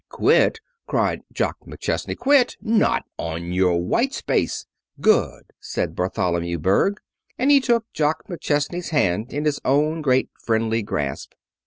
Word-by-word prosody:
"Quit!" 455 - +3 0.3
cried - - 0
Jock - - -1
McChesney. - - -3
"Quit! 275 -2 +3
Not 220 -1 +2 0.2
on 85 +1 -4
your 90 -1 +3
white 85 - 0
space!" - - -1 0.3
"Good!" - - +2 0.2
said - - -3
Bartholomew 85 -1 -1
Berg, 95 - +2 0.4
and 265 +3 +3
took 235 -3 +2
Jock 150 0 0
McChesney's 170 0 -2
hand 110 - 0
in 145 +2 -3
his 150 -2 +1
own 150 +4 +1
great 130 -3 +2
friendly 115 0 +1
grasp. 75 -9 -4
135 Hz, 130 wpm, -22 LUFS, -, 0.4 s, Quit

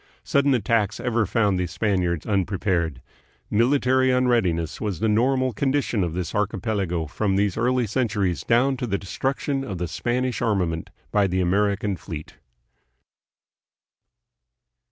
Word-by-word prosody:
Sudden 140 -1 +2
attacks 110 -1 0
ever 120 -4 0
found 100 -3 +1
the 90 - 0
Spaniards 90 -3 -1
unprepared. 90 - -1 0.5
Military 130 +3 +3
unreadiness 115 -11 +1
was 100 -6 -2
the 110 - +1
normal 130 +4 +2
condition 135 -3 0
of 85 -2 -3
this 90 -2 -3
archipelago 100 -4 -1
from 95 +6 -1
these 100 -1 +1
early 125 +1 +1
centuries 105 -5 -1
down 130 +4 +3
to 125 - -3
the 100 - 0
destruction 135 +7 -2
of 100 -9 -5
the 90 0 -2
Spanish 120 +6 -2
armament 90 -7 0 0.2
by 105 -2 +3
the 95 0 -1
American 100 +2 +1
fleet. 80 -4 -8
105 Hz, 130 wpm, -24 LUFS, 90-125 Hz, 0.5 s, Military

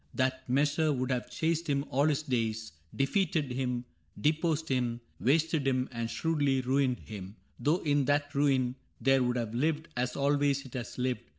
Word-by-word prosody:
That 130 0 -1
measure 150 +4 +2
would 130 -1 -1
have 125 -1 -1
chased 165 0 -1
him 140 0 +1
all 140 +4 +3
his 155 0 +1
days, 115 -5 -1 0.2
Defeated 150 -1 +1
him, 125 -1 -2 0.3
deposed 160 +1 +1
him, 125 -3 0 0.2
wasted 155 +1 +2
him. 130 -1 +1
And 115 -2 -3
shrewdly 145 -3 +1
ruined 130 0 +1
him 100 -1 -8
— - - -38
though 155 +5 +1
in 145 -2 +2
that 145 0 +1
ruin 135 -3 +2 0.2
There 135 0 +4
would 125 0 +1
have 115 -2 -2
lived, 155 +5 0
as 125 0 -1
always 140 0 +2
it 130 - -12
has 125 -3 -5
lived. 125 0 -1
135 Hz, 175 wpm, -30 LUFS, 125-145 Hz, 0.3 s, There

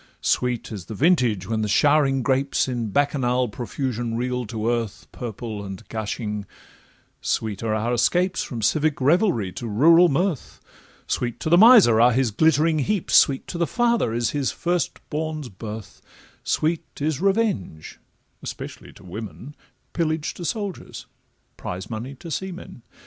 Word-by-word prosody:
Sweet 125 -2 0
is 100 -5 -6
the 110 - -7
vintage, 125 - +2
when 110 0 -1
the 105 - 0
showering 135 +3 +3
grapes 135 +1 +1
In 120 -4 -2
Bacchanal 125 -1 +1
profusion 120 0 -3
reel 125 -1 -2
to 110 0 -3
earth, 115 -3 -2
Purple 110 -3 -6
and 95 -2 -8
gushing: 105 -2 -4 0.7
sweet 105 -3 -2
are 110 -1 0
our 115 +3 -1
escapes 180 +10 +1
From 115 -3 -5
civic 155 +6 +1
revelry 145 - +2
to 120 - -6
rural 165 +11 +5
mirth; 165 0 -1 0.5
Sweet 120 -1 -2
to 155 - -2
the 175 - +7
miser 205 - +8
are 120 +1 +6
his 125 -2 +1
glittering 160 +5 +3
heaps, 195 +5 -1
Sweet 135 -2 +4
to 170 - -6
the 170 - +1
father 235 - +1
is 115 0 0
his 145 -3 -1
first 175 -3 -2
born's 155 -3 -3
birth, 105 +1 -9 0.4
Sweet 160 +1 0 0.2
is 150 0 -1
revenge—especially 195 - -4
to - - -17
women, 110 +8 -8 0.4
Pillage 160 -2 -1
to 175 - -9
soldiers, 200 0 -5 0.5
prize 95 +5 -6
money 120 +5 -5
to 165 +5 -10
seamen. 185 -7 -6
125 Hz, 145 wpm, -23 LUFS, 110-160 Hz, 0.7 s, miser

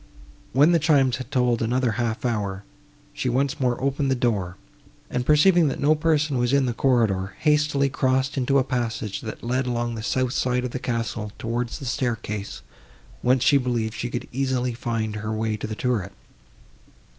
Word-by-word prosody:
When 145 +6 +5
the 170 - +4
chimes 140 -5 +3
had 130 -2 -7
tolled 125 -4 +1
another 120 +1 +1
half 115 +2 -2
hour, 100 -4 -2 0.5
she 130 - -2
once 135 +4 0
more 125 -2 +1
opened 140 +1 0
the 135 - +2
door, 100 -8 -1 0.5
and, 125 0 -2
perceiving 165 +2 +5
that 135 - -2
no 145 +2 +4
person 150 -3 +1
was 120 +2 +1
in 140 -1 +4
the 120 - -1
corridor, 110 -7 +1
hastily 150 -2 +2
crossed 130 0 0
into 135 +1 +2
a 135 - +4
passage, 120 -5 -3
that 110 - -7
led 125 +2 -1
along 120 -1 -1
the 110 - -5
south 130 +2 0
side 125 -1 0
of 125 - -4
the 130 - -4
castle 115 -4 -3
towards 120 +1 -3
the 140 - -8
staircase, 110 - -3 0.6
whence 125 0 +3
she 140 - +5
believed 120 -4 -1
she 120 - -4
could 120 - -4
easily 130 -1 -1
find 115 -2 -3
her 110 +1 -4
way 110 0 -1
to 105 - -5
the 110 - -5
turret. 110 -6 -1
125 Hz, 180 wpm, -24 LUFS, 115-135 Hz, 0.6 s, When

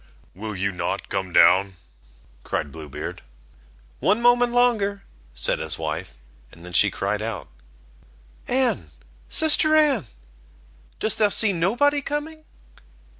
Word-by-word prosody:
"Will 105 +3 -7
you 100 +1 -2
not 90 - -4
come 95 -2 -3
down?" 95 +2 +4 0.7
cried 70 - -3
Blue 80 -1 -10
Beard. - - -7 0.8
"One 210 +3 +2
moment 245 0 +3
longer," 215 -5 +1 0.3
said - - +1
his - - 0
wife, - - -5 0.3
and 85 +1 -14
then 90 - -10
she - - +4
cried 100 +2 -3
out: 110 -1 -5 1.0
"Anne, 245 - 0 0.4
sister 310 0 +4
Anne, 285 - +2 0.9
dost 220 - 0
thou 210 -1 +4
see 205 0 +4
nobody 245 - +1
coming?" 310 +2 -5
200 Hz, 125 wpm, -23 LUFS, -, 1.0 s, down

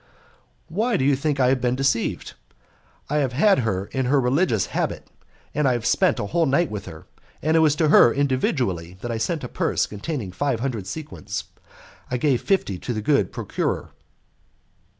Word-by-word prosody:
"Why 215 +8 0
do 130 - 0
you 140 0 +4
think 145 +1 -1
I 125 -1 +4
have 130 -1 +1
been 125 0 +1
deceived? 135 -3 -1 0.7
I 150 - -1
have 135 -4 0
had 195 +8 +4
her 100 -5 -1
here 130 - -2
in 130 - +1
her 140 +2 +3
religious 125 - +2
habit, - - -2 0.5
and 150 -1 +1
I 130 - +3
have 120 -2 -3
spent - - +3
a - - -2
whole 165 +10 +1
night 145 +3 +2
with 105 -2 -6
her; 80 - -10 0.4
and 155 +2 +2
it - - +6
was 155 -2 +4
to 155 0 +2
her 120 - +7
individually 125 - -1
that 120 - -4
I 115 - -2
sent 160 +4 -2
a - - -3
purse - - 0
containing 105 - -5
five 130 +4 -1
hundred 115 -7 -3
sequins. 105 -8 -6 0.7
I 125 - -1
gave 130 -1 +1
fifty 135 - 0
to 125 - -4
the 110 - -3
good 125 -8 +2
procurer." - - -3
130 Hz, 190 wpm, -23 LUFS, 110-150 Hz, 0.7 s, her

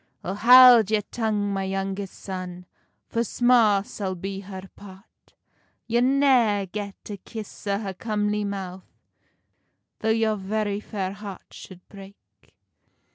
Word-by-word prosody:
"O 185 - -3
haud 240 0 +8
your 215 -1 +1
tongue, 210 -3 -2
my 195 0 -2
youngest 195 0 -4
son, 180 -2 -7 0.4
For 230 - -1
sma 230 -4 +3
sall 190 -3 -5
be 195 +2 -5
her 190 -1 -9
part; 195 -1 -16 0.5
You'll 235 +2 +1
neer 255 -7 +3
get 200 +1 -6
a 205 - -6
kiss 215 0 -10
o 200 0 +1
her 200 -2 -5
comely 210 +1 -2
mouth 190 -2 -6 1.1
Tho 220 - -1
your 220 -1 +1
very 205 +1 -2
fair 195 -3 -4
heart 200 -2 -9
should 180 -1 -13
break." 200 0 -13
205 Hz, 130 wpm, -24 LUFS, 195-220 Hz, 1.1 s, haud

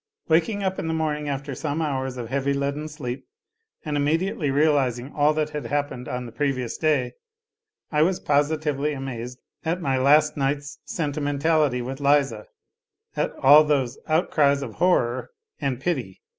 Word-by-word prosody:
Waking 175 +6 +2
up 190 0 -1
in - - -3
the 160 - -1
morning 150 -2 -1
after 140 0 -4
some 150 +3 -3
hours 135 -4 -2
of 120 -2 -5
heavy, 140 +1 0
leaden 140 +2 -2
sleep, 140 -5 -6 0.6
and 150 -1 -2
immediately 155 +2 0
realizing 135 -3 +1
all 150 0 +3
that 155 0 -1
had 150 -1 -4
happened 145 -4 -2
on 125 0 -4
the 120 - -9
previous 130 -4 -1
day, 145 -6 +1 0.8
I 150 -1 +2
was 180 +3 +2
positively 150 0 0
amazed 125 -3 -6 0.3
at 170 +2 -1
my 135 -6 0
last 150 +3 +4
night's 140 +1 -2
sentimentality 145 -3 0
with 135 +2 -5
Liza, 140 -6 +2 0.7
at - - 0
all 145 +3 +7
those 135 -4 0
" - - -27
outcries 140 -5 +2
of 115 -5 -6
horror 130 -9 +2 0.3
and 135 -4 -1
pity." 135 - -3
145 Hz, 155 wpm, -24 LUFS, 135-155 Hz, 0.8 s, all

